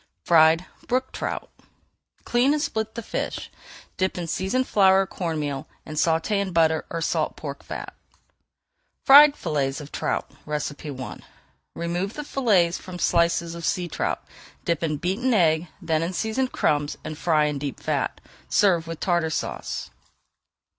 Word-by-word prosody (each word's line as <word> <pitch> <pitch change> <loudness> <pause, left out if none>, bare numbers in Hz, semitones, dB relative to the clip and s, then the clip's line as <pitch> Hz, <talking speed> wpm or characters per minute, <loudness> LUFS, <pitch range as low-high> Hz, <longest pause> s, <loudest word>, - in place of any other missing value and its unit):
FRIED 165 +1 +5 0.2
BROOK 255 +1 0
TROUT - - -4 0.8
Clean 250 +4 +3
and 300 - 0
split 220 0 -2
the 230 - -5
fish, - - -4 0.5
dip 185 0 0
in 175 - -3
seasoned 190 +10 -1
flour 190 -1 +5
or - - -5
corn 170 -4 -3
meal, 145 -2 -3 0.2
and 155 - -7
sauté 165 +5 +1
in 195 -2 -3
butter 160 -2 +2
or 165 - -3
salt - - 0
pork - - -7
fat. - - -7 1.1
FRIED 285 +1 +9
FILLETS 135 -3 -1
OF 150 -1 -10
TROUT - - -2 0.2
I 145 -3 -4 0.6
Remove 175 +4 -2
the 295 - -4
fillets 205 -12 +2
from 185 -1 -8
slices 170 -1 +2
of 170 0 -8
sea 180 +1 0
trout, - - -2 0.4
dip 170 -2 0
in 155 -3 -1
beaten 210 - 0
egg, 165 -3 +3
then 160 -1 0
in 170 +3 -2
seasoned 225 +6 -1
crumbs, 145 -1 0
and 155 - -5
fry 155 -1 +2
in 150 -1 -1
deep 140 -1 -4
fat. - - -1 0.3
Serve 175 - +3
with 165 -1 -6
Tartar 170 -3 +1
Sauce. 160 - -4
170 Hz, 155 wpm, -24 LUFS, 155-195 Hz, 1.1 s, FRIED